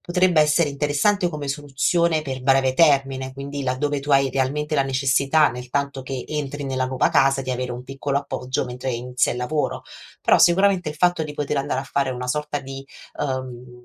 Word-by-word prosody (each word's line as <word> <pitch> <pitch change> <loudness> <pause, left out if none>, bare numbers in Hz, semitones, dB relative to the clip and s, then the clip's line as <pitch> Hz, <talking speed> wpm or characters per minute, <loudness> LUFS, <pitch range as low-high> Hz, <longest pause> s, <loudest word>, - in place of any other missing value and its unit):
potrebbe 180 -2 +2
essere 150 0 +3
interessante 150 +7 +1
come 150 -3 -6
soluzione 150 +4 0
per 130 -3 -5
breve 135 -1 +3
termine, 135 -3 +2
quindi 140 +1 -6
laddove 140 +3 -1
tu 145 +1 -2
hai 135 -1 +4
realmente 145 +4 -1
la 140 - +3
necessità 135 +3 +2
nel 125 +1 -8
tanto 140 +1 -2
che 130 -1 -5
entri 145 -1 -4
nella 130 -1 -1
nuova 130 0 +1
casa 135 0 +3
di 130 - -4
avere 125 0 -3
un 125 +1 -6
piccolo 135 +1 -3
appoggio 130 -2 -2
mentre 125 +1 -4
inizia 125 +1 0
il - - -6
lavoro. 145 +5 -2 0.4
Però, - - +4
sicuramente, 185 -1 +4
il 150 - -5
fatto 175 +1 +2
di 150 -1 -6
poter 145 -1 -2
andare 135 -1 -1
a - - -5
fare 140 0 -1
una 125 0 -4
sorta 150 +2 -2
di 135 0 -8 0.4
uhm, 125 -3 -5
140 Hz, 190 wpm, -22 LUFS, 130-150 Hz, 0.4 s, hai